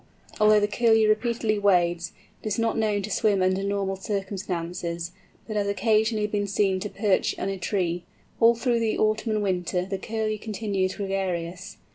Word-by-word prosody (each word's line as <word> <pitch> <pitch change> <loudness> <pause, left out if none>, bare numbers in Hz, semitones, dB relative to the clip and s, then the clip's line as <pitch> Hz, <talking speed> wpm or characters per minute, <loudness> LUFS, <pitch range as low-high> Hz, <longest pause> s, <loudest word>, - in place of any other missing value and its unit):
Although 215 0 +6
the 205 - +2
Curlew 225 0 +3
repeatedly 215 0 +1
wades, 175 -3 +2 0.3
it - - -6
is 210 - -1
not 230 -1 +1
known 210 -2 0
to 215 - -5
swim 200 -2 +2
under 185 +1 +1
normal 200 -1 -1
circumstances, 180 -4 -4 0.3
but 215 - -6
has 205 -1 0
occasionally 215 +1 +2
been 205 -1 -1
seen 195 -1 +1
to 210 - -4
perch 200 -2 +1
in 195 - -3
a 195 - -3
tree. 175 -3 -1 0.4
All 230 0 +6
through 235 0 +1
the 225 -1 0
autumn 215 +1 +1
and 210 -1 0
winter 180 -2 -1
the 195 0 -4
Curlew 215 0 -2
continues 200 -4 -2
gregarious. 185 -3 -3
200 Hz, 170 wpm, -26 LUFS, 185-215 Hz, 0.4 s, Although